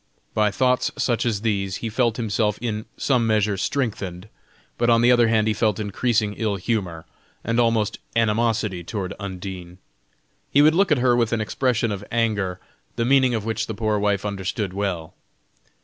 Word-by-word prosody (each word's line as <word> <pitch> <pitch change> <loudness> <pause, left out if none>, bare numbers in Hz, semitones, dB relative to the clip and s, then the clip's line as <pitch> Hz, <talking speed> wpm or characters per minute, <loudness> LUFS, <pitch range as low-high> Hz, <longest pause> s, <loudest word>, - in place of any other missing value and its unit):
By 105 -1 +3
thoughts 125 +4 +1
such 120 -1 0
as 105 -4 -1
these, 100 -4 -1
he 115 - -4
felt 115 0 +1
himself 105 -2 0
in 110 -3 -3
some 125 -4 +1
measure 105 -2 +2
strengthened, 100 -4 -3 0.5
but 120 0 +2
on 115 0 +5
the 120 - +6
other 120 -2 +5
hand, 110 -1 +2
he 110 - +2
felt 105 -1 0
increasing 105 +1 0
ill 110 -3 0
humor, 95 -5 -3 0.4
and 115 +1 0
almost 115 -3 +1 0.2
animosity 110 -4 +1
toward 95 +1 -4
Undine. 95 -2 -7 0.7
He 145 - +5
would 155 +1 +6
look 190 0 +2
at 150 - +5
her 125 0 +3
with 120 -1 +1
an 115 - +1
expression 115 +2 0
of 100 0 -4
anger, 105 -6 0 0.4
the 115 - 0
meaning 130 -1 +4
of 110 -2 -3
which 115 +1 -2
the 110 - -4
poor 110 -1 0
wife 100 -1 0
understood 100 0 -3
well. 95 -5 -3
110 Hz, 175 wpm, -23 LUFS, 100-120 Hz, 0.7 s, the